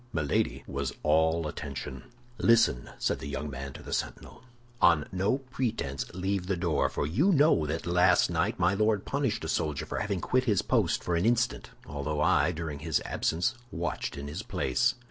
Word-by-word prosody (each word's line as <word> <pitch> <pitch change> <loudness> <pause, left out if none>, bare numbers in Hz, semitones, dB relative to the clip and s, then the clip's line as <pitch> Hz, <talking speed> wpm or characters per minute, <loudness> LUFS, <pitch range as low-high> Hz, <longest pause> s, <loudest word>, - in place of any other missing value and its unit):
Milady 70 -4 0
was - - -3
all 80 +1 +3
attention. 65 -3 -6 0.3
"Listen," 115 - +3
said - - 0
the 70 - -6
young 70 +1 -4
man 70 0 -6
to - - -10
the - - -6
sentinel. - - -4 0.4
"On 75 -3 +5
no 95 +7 +1
pretense 120 - -3
leave 95 0 -2
the 95 -1 0
door, 85 -3 +1
for - - -2
you 130 - +2
know 145 - +4
that 80 +2 -3
last 90 +1 +4
night - - 0
my 90 +3 +3
Lord 105 0 +1
punished 135 - -1
a - - -3
soldier 75 -2 -1
for - - -4
having 100 -3 -1
quit 130 +8 +1
his 105 -6 +2
post - - +1
for 90 - 0
an 85 +6 +2
instant, 120 0 +1 0.2
although 75 +1 -3
I, 75 +2 +3
during 80 -3 -5
his 80 0 0
absence, 85 +9 0 0.2
watched 100 - -3
in 70 0 -6
his 75 - -5
place." 130 - 0
85 Hz, 185 wpm, -29 LUFS, 75-110 Hz, 0.4 s, On